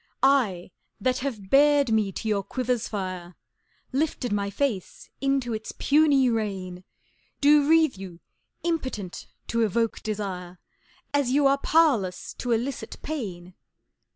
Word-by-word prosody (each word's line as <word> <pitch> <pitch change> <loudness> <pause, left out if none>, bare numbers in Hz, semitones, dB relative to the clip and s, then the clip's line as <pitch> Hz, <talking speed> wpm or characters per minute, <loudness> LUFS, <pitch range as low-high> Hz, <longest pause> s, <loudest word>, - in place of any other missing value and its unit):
I, 230 -11 +2 0.3
that 255 0 0
have 225 -8 -5
bared 285 -2 +5
me 215 -3 +2
to 220 - -5
your 210 -2 +1
quiver's 245 +1 -2
fire, 185 -4 -5 0.6
Lifted 270 -4 -1
my 200 -1 -1
face 210 -3 -3
into 275 -3 0
its 220 0 -5
puny 285 -3 +4
rain, 195 -6 -2 0.6
Do 290 0 +5
wreathe 320 -8 +4
you 185 -3 -9 0.4
Impotent 260 - -3 0.2
to 230 - +1
Evoke 225 +1 0
Desire 190 -4 -5 0.6
As 285 -3 +2
you 280 +2 +3
are 275 0 +4
Powerless 275 - +2
to 245 - -2
Elicit 240 +3 -2
Pain! 185 - -5
235 Hz, 125 wpm, -26 LUFS, 195-275 Hz, 0.6 s, bared